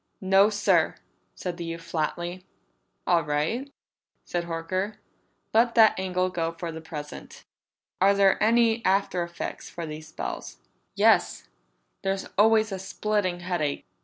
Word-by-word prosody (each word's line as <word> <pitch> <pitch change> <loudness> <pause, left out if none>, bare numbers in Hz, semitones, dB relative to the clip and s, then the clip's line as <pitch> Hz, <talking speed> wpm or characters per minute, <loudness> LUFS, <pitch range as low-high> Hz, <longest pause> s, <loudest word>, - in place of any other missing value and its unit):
"No, 195 +2 +5
sir," 200 -5 +2 0.4
said 175 -1 -5
the 175 - -5
youth 165 0 -6
flatly. 175 +3 -3 0.6
"All 170 -2 +3
right," 155 - -1 0.5
said 175 -1 -2
Horker. 185 +5 -3 0.6
"Let 230 +2 +3
that 220 -2 +7
angle 185 -1 0
go 165 -2 -2
for 165 0 -5
the 160 0 -8
present. 150 -2 -9 0.6
Are 200 +1 +5
there 195 -1 +4
any 230 +1 +3
after 190 -2 +1
effects 170 0 -5
from 170 -2 -6
these 155 +1 -8
spells?" 155 - -6 0.4
"Yes. - - +3 0.5
There's 195 0 -1
always 220 +1 +4
a 190 - -3
splitting 195 -2 -1
headache." 175 -5 -2
185 Hz, 135 wpm, -26 LUFS, 165-200 Hz, 0.6 s, that